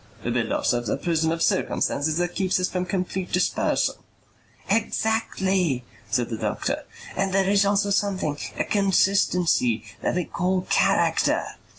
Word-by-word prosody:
"We -, -, 0 dB
build -, -, -1 dB
ourselves 120 Hz, -2 st, 0 dB
a -, -, 0 dB
prison 160 Hz, -2 st, 0 dB
of 165 Hz, 0 st, -1 dB
circumstances 155 Hz, +2 st, 0 dB
that 175 Hz, 0 st, -1 dB
keeps 190 Hz, -1 st, +1 dB
us 180 Hz, -, +1 dB
from 180 Hz, 0 st, -2 dB
complete 185 Hz, -1 st, -3 dB
dispersal." 180 Hz, -, +1 dB, 0.7 s
"Exactly," 195 Hz, -, 0 dB, 0.3 s
said 120 Hz, +1 st, 0 dB
the 110 Hz, -, -3 dB
doctor. -, -, -2 dB, 0.3 s
"And 195 Hz, -1 st, 0 dB
there 190 Hz, 0 st, +2 dB
is 200 Hz, 0 st, +3 dB
also 200 Hz, 0 st, +2 dB
something, 195 Hz, -7 st, 0 dB, 0.2 s
a -, -, +1 dB
consistency, 180 Hz, -, +2 dB, 0.2 s
that -, -, 0 dB
we 180 Hz, -2 st, 0 dB
call 185 Hz, +1 st, 0 dB
character." -, -, +2 dB
185 Hz, 145 wpm, -24 LUFS, 160-195 Hz, 0.7 s, is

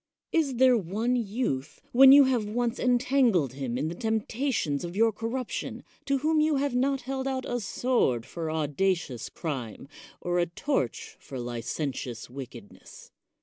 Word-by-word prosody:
Is 300 Hz, -6 st, +1 dB
there 255 Hz, +1 st, +5 dB
one 220 Hz, +5 st, 0 dB
youth, 205 Hz, -, -2 dB
when 265 Hz, +2 st, +8 dB
you 285 Hz, +1 st, +9 dB
have 250 Hz, -5 st, +1 dB
once 240 Hz, +2 st, -1 dB
entangled 245 Hz, -, +2 dB
him 130 Hz, -3 st, -3 dB
in 145 Hz, +4 st, -1 dB
the 165 Hz, -, -3 dB
tempta 225 Hz, +6 st, -1 dB
tions 145 Hz, -, -1 dB
of 175 Hz, +1 st, -6 dB
your 225 Hz, +2 st, +4 dB
corruption, 230 Hz, +3 st, -4 dB, 0.2 s
to 275 Hz, -1 st, +1 dB
whom 310 Hz, +3 st, +2 dB
you 310 Hz, -1 st, +2 dB
have 280 Hz, -1 st, 0 dB
not 270 Hz, +2 st, +1 dB
held 265 Hz, +1 st, -3 dB
out 260 Hz, -1 st, -2 dB
a 245 Hz, -, -2 dB
sword 195 Hz, -, 0 dB
for 160 Hz, +3 st, -5 dB
audacious 155 Hz, -, -1 dB
crime, 135 Hz, -7 st, -5 dB, 0.3 s
or 175 Hz, 0 st, -1 dB
a 175 Hz, -, +2 dB
torch 440 Hz, -, -2 dB
for 135 Hz, -, -9 dB
licentious 120 Hz, 0 st, -4 dB
wickedness? 130 Hz, -1 st, -11 dB
225 Hz, 155 wpm, -27 LUFS, -, 0.3 s, you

